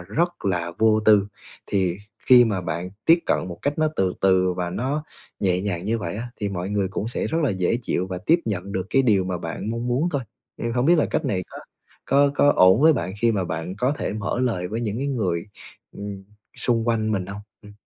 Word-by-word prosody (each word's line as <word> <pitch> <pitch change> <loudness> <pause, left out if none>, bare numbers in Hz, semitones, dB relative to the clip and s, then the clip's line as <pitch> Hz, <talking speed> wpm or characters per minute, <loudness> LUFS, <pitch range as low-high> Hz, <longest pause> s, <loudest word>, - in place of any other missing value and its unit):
rất 170 - -2
là 85 -3 -1
vô 110 0 +4
tư. 105 -2 +5 0.4
Thì 95 -2 0 0.3
khi 125 -1 +8
mà 105 -5 -1
bạn 85 +2 -4 0.2
tiếp 165 +1 +7
cận 90 - 0
một 85 -1 -8
cách 145 +2 -1
nó 155 0 +3
từ 95 -1 +1
từ 95 -1 +3
và 90 -1 -3
nó 135 +9 -2 0.4
nhẹ 90 -2 +1
nhàng 95 -3 -3
như 115 +2 0
vậy 85 -2 -4
á, 120 +3 -5
thì 105 - -2
mọi 95 0 -4
người 100 -2 0
cũng 100 +3 -3
sẽ - - -2
rất 160 - -1
là 145 - +2
dễ 95 +4 0
chịu 95 -4 -1
và 90 -1 -5
tiếp 170 +2 +4
nhận 100 -2 -3
được 95 0 -2
cái 135 - +4
điều 105 -7 +3
mà 90 -1 -3
bạn 85 +6 -5
mong 115 +1 -3
muốn 135 +8 +1
thôi. 140 -3 -1 0.3
Ừm, 115 0 -3
hông 125 +3 +1
biết 170 -1 +5
là - - +3
cách - - -1
này 95 -3 -1
có - - -9 0.5
có 140 +1 +4
có 145 0 +4
ổn 95 +6 +6
với 160 - +7
bạn 95 -10 -3
khi 115 -1 +3
mà 95 -3 0
bạn 80 +3 -4
có 125 +6 +1
thể - - -2
mở 110 +3 -2
lời 95 -8 -1
với 110 +3 -3
những 110 0 -2
cái 140 - -2
người, 100 -9 -1 0.5
ừm, 100 -1 -7 0.3
xung 115 -2 0
quanh 110 -2 +1
mình 95 -3 -1
hông? 100 +1 -7 0.2
Ừm. 105 0 -13
105 Hz, 240 wpm, -23 LUFS, 95-120 Hz, 0.5 s, khi